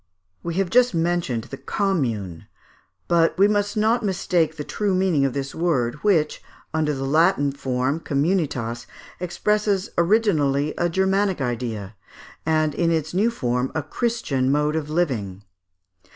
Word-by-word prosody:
] 90 - -50
We 170 -1 -4
have 190 -1 0
just 250 -5 +4
mentioned 165 -8 0
the 135 - -9
Commune; 115 - -2 0.6
but 170 -1 +2
we 200 +2 +6
must 205 +1 0
not 225 +3 +2
mistake 180 -5 0
the 150 - -4
true 200 +4 -1
meaning 180 -7 +2
of 135 - -1
this 135 0 -4
word, 145 -9 0
which, 165 -7 +2 0.3
under 155 -1 +1
a 135 -1 -3
Latin 155 0 +3
form 135 +1 -1
(communitas), 140 -7 -1 0.3
expresses 200 +3 0
originally 160 -7 +2
a 175 - 0
Germanic 190 +1 +1
idea, 115 -5 -3 0.5
and 155 -1 +2
in 170 +2 +1
its 160 -1 -1
new 205 +6 +3
form 125 - -1
a 160 - -1
Christian 145 - -1
mode 150 +1 +1
of 155 -2 -2
living. 115 - -1
160 Hz, 145 wpm, -23 LUFS, 135-190 Hz, 0.6 s, we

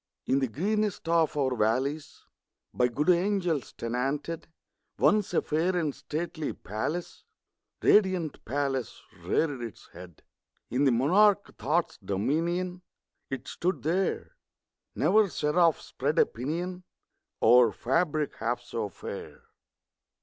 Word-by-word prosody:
In 135 - +2
the 135 - +1
greenest 205 - -1
of 165 -2 +2
our 130 -3 +1
valleys 130 +7 -1 0.5
By 125 - +3
good 145 +9 +2
angels 180 -5 0
tenanted, 135 +7 -3 0.5
Once 210 -1 +3
a 175 - +1
fair 175 +4 0
and 155 -5 0
stately 155 +3 -4
palace 145 - -4 0.6
Radiant 185 -7 +3
palace 135 -1 -2 0.2
reared 145 -6 0
its 115 -2 -8
head. 90 -3 -12 0.5
In 130 +4 +2
the 135 - +5
monarch 195 - +3
Thought's 155 +9 -1
dominion 165 - -1 0.5
It 135 -2 -5
stood 175 -7 -2
there! 185 - -1 0.6
Never 215 -1 +4
seraph 165 +1 +2
spread - - -3
a - - +6
pinion 170 +9 -4 0.6
Over 120 0 +6
fabric 150 - 0
half 120 +2 -1
so 115 -3 -4
fair! - - -8
150 Hz, 115 wpm, -28 LUFS, 125-175 Hz, 0.6 s, a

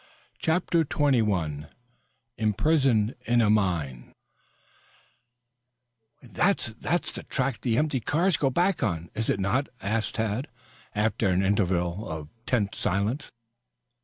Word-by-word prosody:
CHAPTER 170 0 +2
XXI 105 - +1 0.7
IMPRISONED 115 0 +2
IN 120 0 +3
A 105 -3 +4
MINE 85 - 0 2.1
"That 130 - 0
that's 175 - 0
the - - -7
track 135 -1 -1
that - - -37
the 115 -3 +1
empty 150 -2 +1
cars 165 - +2
go 135 - +1
back 175 +7 +1
on, 85 -1 -2
is 110 +1 -2
it 100 - +1
not?" 100 +9 0
asked 110 +3 -1
Tad, 110 +5 -1 0.5
after 105 0 +1
an 95 0 +2
interval 95 -1 0
of 80 -2 -6 0.2
tense 105 -6 0
silence. 105 +8 -1
110 Hz, 120 wpm, -27 LUFS, 95-135 Hz, 2.1 s, A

